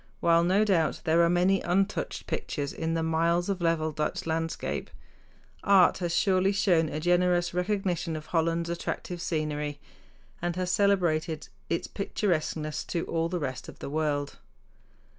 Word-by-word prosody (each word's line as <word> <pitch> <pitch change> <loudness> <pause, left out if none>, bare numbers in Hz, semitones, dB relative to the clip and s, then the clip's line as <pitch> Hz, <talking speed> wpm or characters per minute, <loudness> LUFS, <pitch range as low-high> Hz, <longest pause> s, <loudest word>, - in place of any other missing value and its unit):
While, 170 0 +4
no 190 +5 +3
doubt, 175 -6 +1
there 165 +1 +3
are 170 - +4
many 180 +2 +3
"untouched 195 +4 -1
pictures" 140 -2 -3
in 165 0 -2
the 165 - 0
miles 170 +3 +1
of 190 -2 -1
level 165 -2 +1
Dutch 155 +5 -2
landscape, 165 0 -2 0.7
art 195 -2 +5
has 175 -2 -2
surely 190 +1 +3
shown 175 -5 +2
a 150 - -3
generous 175 +1 +2
recognition 180 -3 -1
of 155 0 -6
Holland's 165 +1 0
attractive 170 0 -4
scenery, 150 -3 -2 0.6
and 175 0 -1
has 180 0 -1
celebrated 170 -6 +1 0.2
its 170 - -1
picturesqueness 160 -6 -2
to 170 - -2
all 165 0 -1
the 180 - -2
rest 135 -5 -4
of - - -11
the - - -7
world. 150 -2 -1
170 Hz, 150 wpm, -28 LUFS, 160-180 Hz, 0.7 s, art